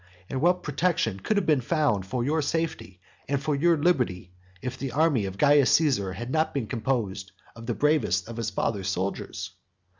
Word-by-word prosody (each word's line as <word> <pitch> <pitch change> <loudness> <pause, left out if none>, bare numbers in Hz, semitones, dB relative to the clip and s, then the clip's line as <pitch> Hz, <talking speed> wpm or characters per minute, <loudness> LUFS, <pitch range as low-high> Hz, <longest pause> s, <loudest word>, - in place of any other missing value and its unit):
And 130 - -2
what 180 +2 +2
protection 145 - 0
could 210 - 0
have 200 - +1
been 150 -4 +3
found 120 - 0
for 120 +3 -2
your 155 +5 +1
safety 145 - -3 0.3
and 140 0 0
for 150 +2 -1
your 165 +4 +3
liberty 125 - 0 0.3
if 125 +3 -5
the 135 -2 -5
army 145 -7 +2
of 95 0 -6
Caius 145 0 +5
Caesar 125 - +2
had 120 +7 -6
not 155 0 0
been 135 -5 -1
composed 110 -5 -2 0.2
of 115 0 -10
the 120 - -1
bravest 145 - +1
of 115 0 -8
his 115 -2 -2
father's 100 -1 -2
soldiers? 95 +1 -3
130 Hz, 185 wpm, -26 LUFS, 100-155 Hz, 0.3 s, Caius